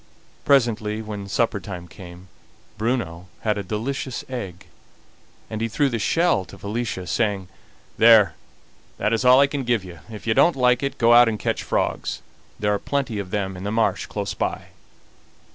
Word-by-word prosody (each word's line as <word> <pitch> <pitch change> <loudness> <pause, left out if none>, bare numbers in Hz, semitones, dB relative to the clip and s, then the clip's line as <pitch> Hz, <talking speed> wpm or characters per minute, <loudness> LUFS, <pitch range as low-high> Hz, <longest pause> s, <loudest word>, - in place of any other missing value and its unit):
Presently, 110 -5 +2
when 105 -2 -6
supper 105 +2 0
time 90 -3 -8
came, 90 +1 -12 0.5
Bruno 105 -7 -2
had 105 -2 0
a - - -4
delicious 120 +6 -3
egg, 100 -9 -6 0.8
and 110 0 -5
he 115 - +1
threw 140 +5 +1
the 115 -3 -2
shell 165 - +2
to - - -13
Felicia, 105 -3 -4
saying: 100 -3 -1 0.5
"There, 110 -6 +7 0.6
that 105 - 0
is 115 - +1
all 125 +1 +7
I 140 - +7
can 140 -1 -3
give 120 -4 +1
you; 85 -3 -10
if 110 -2 -9
you 110 - +2
don't 170 - +4
like 125 -2 +3
it, 140 0 -3
go 115 0 +5
out 120 0 +7
and 110 - -2
catch - - -2
frogs; - - -2 0.4
there 105 0 +1
are 100 - -1
plenty 135 -5 -2
of 95 -2 -5
them 95 -1 -2
in 90 - -8
the 100 - -2
marsh 110 0 0
close - - -4
by." - - -3
110 Hz, 180 wpm, -23 LUFS, 100-120 Hz, 0.8 s, There